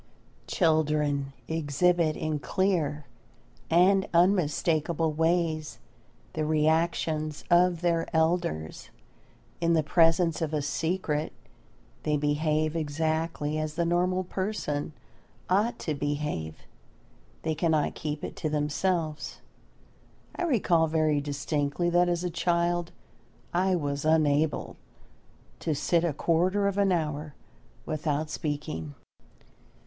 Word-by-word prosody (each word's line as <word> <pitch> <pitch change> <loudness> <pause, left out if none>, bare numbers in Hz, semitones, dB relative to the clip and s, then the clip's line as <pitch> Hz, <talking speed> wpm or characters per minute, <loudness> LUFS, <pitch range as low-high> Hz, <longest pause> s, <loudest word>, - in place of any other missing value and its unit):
Children 150 -4 +1 0.2
exhibit 160 +1 +1
in 155 -1 -2
clear 150 -2 0 0.6
and 190 +3 +4
unmistakable 165 -2 +2
ways 160 -1 0 0.6
the 155 - -1
reactions 155 0 0
of 175 -1 +4
their 170 -2 +1
elders. 160 - -1 0.7
In 170 0 +3
the 160 -2 +3
presence 165 +1 +3
of 155 -1 -1
a 150 - -1
secret 160 0 -1 0.7
they 150 -1 0
behave 150 +2 0
exactly 155 0 -1
as 155 0 -3
the 170 0 0
normal 180 +2 +1
person 180 -6 -3 0.6
ought 215 +5 +2
to 155 - -3
behave. 145 - -3 0.8
They 160 - 0
cannot 155 -1 +1
keep 150 -1 -5
it - - -5
to 155 - -2
themselves. 155 +2 -1 1.0
I 355 - -1
recall 180 - +3
very 155 -2 +1
distinctly 145 +3 -1
that 175 0 +4
as 175 0 -1
a 180 - -2
child 175 0 0 0.6
I 185 +1 +2
was 145 -3 -2
unable 155 -1 +1 0.8
to 155 - -1
sit 170 +4 +1
a 170 - +1
quarter 180 +7 +1
of 200 0 -1
an 200 -1 +3
hour 150 -3 -2 0.5
without 155 0 -2
speaking. 110 - -4
160 Hz, 110 wpm, -28 LUFS, 150-175 Hz, 1.0 s, and